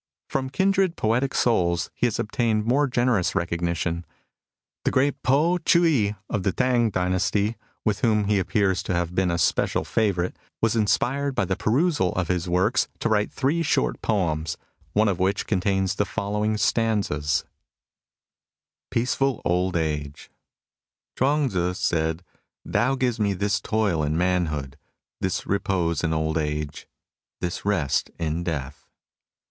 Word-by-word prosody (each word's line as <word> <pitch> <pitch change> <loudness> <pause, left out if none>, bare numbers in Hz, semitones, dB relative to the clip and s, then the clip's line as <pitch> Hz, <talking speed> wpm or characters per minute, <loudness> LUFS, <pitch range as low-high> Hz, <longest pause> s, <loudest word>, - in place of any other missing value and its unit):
'* - - -68
From 130 -1 -1
kindred 190 +4 +2
poetic 120 +3 0
souls 85 -8 +1
he 125 - +1
has 115 - -2
obtained 110 -1 0
more 140 +5 +3
generous 120 -7 +1
recognition. 85 -1 -1 0.8
The - - +2
great 140 +2 +1
Po 160 +7 +3
Chii 160 -10 +3
i, 105 - -6
of 105 - -2
the 95 - +1
Tang 125 0 +2
dynasty, 95 +3 0 0.3
with 105 -2 +1
whom 110 -2 +2
he 100 0 +2
appears 95 -1 +1
to 90 - -2
have 85 0 -1
been 95 0 +1
a 85 - 0
special - - +1
favourite, 95 -5 0 0.2
was 115 0 +1
inspired 135 +6 +1
by 120 - +1
the 95 +1 -1
perusal 130 - +1
of 90 -1 -2
his 90 -1 -1
works 95 +8 +2
to - - -1
write 105 -1 +1
three 145 +5 0
short 65 - 0
poems, 80 -7 -1 0.4
one 110 +1 +3
of 95 -3 0
which 95 +2 +1
contains 95 0 +1
the 105 - 0
following 105 +1 -1
stanzas 100 -11 +1
^: - - -44 1.4
PEACEFUL 130 +3 0
OLD 90 +1 +1
AGE 75 -3 -3 0.8
Chu&ng 140 +1 +2
Tzu 90 -3 -1
said: 80 -3 0 0.5
Tao 130 +3 +2
gives 125 -3 0
me 100 -2 +2
this 100 +2 0
toil 105 -7 0
in 75 +1 0
manhood, 80 -6 -1 0.4
this 95 -1 -2
repose 90 -5 0
in 80 - +1
old 80 0 0
age, 75 -1 -3 0.5
this 85 0 -3
rest 90 -10 +1
in 80 0 -2
death.' 75 -3 -5
100 Hz, 150 wpm, -24 LUFS, 85-120 Hz, 1.4 s, more